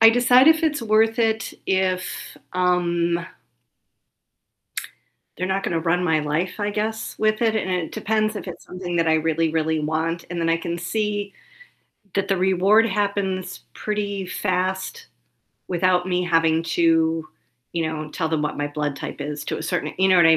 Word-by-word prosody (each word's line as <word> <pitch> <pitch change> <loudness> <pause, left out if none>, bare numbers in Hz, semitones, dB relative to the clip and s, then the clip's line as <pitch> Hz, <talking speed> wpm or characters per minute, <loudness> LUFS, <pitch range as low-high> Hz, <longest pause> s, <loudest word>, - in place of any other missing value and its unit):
I 225 - +11
decide 245 +3 +6
if 320 0 +5
it's 305 -3 +1
worth 220 0 +3
it 225 -1 +1
if, 185 -1 +1 0.5
um 175 -2 +1 2.1
they're 185 +3 -2
not 190 +1 0
gonna 165 -4 -1
run 175 +2 +1
my 160 -3 +2
life, 160 +7 -2
I 205 0 -1
guess, 220 +2 -3
with 215 +1 +1
it, 225 -1 +3
and 190 -3 -1
it 180 -3 -2
depends 215 0 0
if 200 - -6
it's 175 - -8
something 180 -1 -5
that 165 -1 +2
I 160 - +4
really, 160 0 +1
really 160 -1 0
want, 160 +2 -1
and 175 - -3
then 165 - 0
I 165 - +3
can 170 +1 -4
see 205 +2 -2 0.8
that 195 -1 0
the 195 - +2
reward 190 +4 +4
happens 200 -2 -1
pretty 205 -2 -3
fast 190 - -2 0.6
without 180 0 +2
me 180 0 +1
having 165 -2 +3
to, 165 -1 +2 0.5
you 165 -2 0
know, 155 -1 -5
tell 160 0 -2
them 155 -1 0
what 150 - -2
my 145 - -1
blood 145 -1 -3
type - - -6
is 145 0 -4
to - - -2
a - - -6
certain 180 -2 -2
you 190 0 +4
know 185 - +6
what 170 - +7
I 160 0 +7
180 Hz, 175 wpm, -23 LUFS, 165-205 Hz, 2.1 s, I